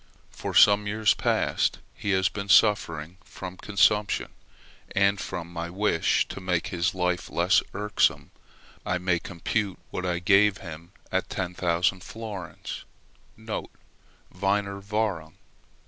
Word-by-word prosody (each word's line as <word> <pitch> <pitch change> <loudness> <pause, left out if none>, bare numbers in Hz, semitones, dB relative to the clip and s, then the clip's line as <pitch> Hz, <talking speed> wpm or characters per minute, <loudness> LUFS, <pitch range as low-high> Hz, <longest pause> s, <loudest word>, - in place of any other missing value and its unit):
For - - -6
some 105 0 +6
years 110 0 +3
past - - +1 0.2
he 100 - -5
has 95 -1 +3
been 100 -1 -5
suffering 90 -6 +3
from 90 -1 -8
consumption, 105 +1 +2 0.7
and 100 0 +3
from 85 0 -6
my 85 0 -4
wish 95 -2 +1
to - - -7
make 90 -2 -1
his 85 +1 -1
life 90 -1 -1
less 90 +3 +3
irksome 105 +1 +1 0.5
I 90 - 0
may 90 -1 +1
compute 95 +3 -2
what 90 - -4
I 85 -1 0
gave 95 +3 +4
him 85 0 -10 0.2
at 95 0 -1
10,000 90 0 0
florins 105 -6 -7 0.5
(Wiener 110 0 -5 1.1
Währung). 100 -6 -2
95 Hz, 120 wpm, -26 LUFS, 85-105 Hz, 1.1 s, some